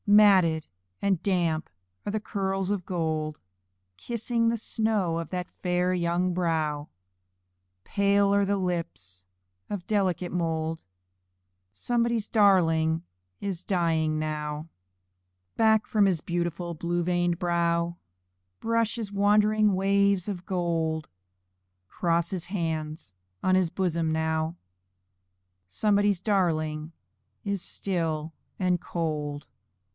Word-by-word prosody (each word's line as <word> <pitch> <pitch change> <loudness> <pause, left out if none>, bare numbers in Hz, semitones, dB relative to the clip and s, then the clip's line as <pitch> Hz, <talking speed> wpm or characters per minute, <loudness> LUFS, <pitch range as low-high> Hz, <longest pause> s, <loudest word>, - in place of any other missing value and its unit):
Matted 190 -6 +5 0.3
and 195 -4 +1
damp 170 -5 0 0.4
are 205 - -1
the 215 - 0
curls 195 -2 -1
of 195 -4 -2
gold 155 -3 -2 0.6
Kissing 235 - 0
the 230 - 0
snow 210 -7 0
of 165 - -5
that 180 -1 -3
fair 180 0 +1
young 175 +1 +1
brow, 155 -4 -1 0.9
Pale 200 0 +3
are 200 0 +4
the 200 +1 +1
lips 95 - -4 0.4
of 200 -4 -4
delicate 185 -4 0
mould 165 -2 -1 0.9
Somebody's 235 - 0
darling 165 -6 +3 0.4
is 190 -4 -3
dying 165 -4 +1
now. 150 0 -3 0.9
Back 220 -1 +4
from 210 -2 +3
his 180 -4 +2
beautiful 170 +1 -2
blue 175 +2 -1
veined 175 0 +1
brow 170 -1 +1 0.6
Brush 230 0 +1
his 220 -4 -4
wandering 210 0 +4
waves 200 0 +2
of 185 -3 -5
gold; 165 -4 -1 0.8
Cross 170 - 0
his 180 -2 -3
hands 160 - -3 0.3
on 185 - +3
his 185 -2 +3
bosom 170 -3 0
now 160 +1 -1 1.1
Somebody's 205 - +2
darling 160 -6 0 0.5
is 200 -2 -1
still 165 -5 -2 0.3
and 180 -2 +1
cold. 150 -3 -3
175 Hz, 110 wpm, -27 LUFS, 160-200 Hz, 1.1 s, Matted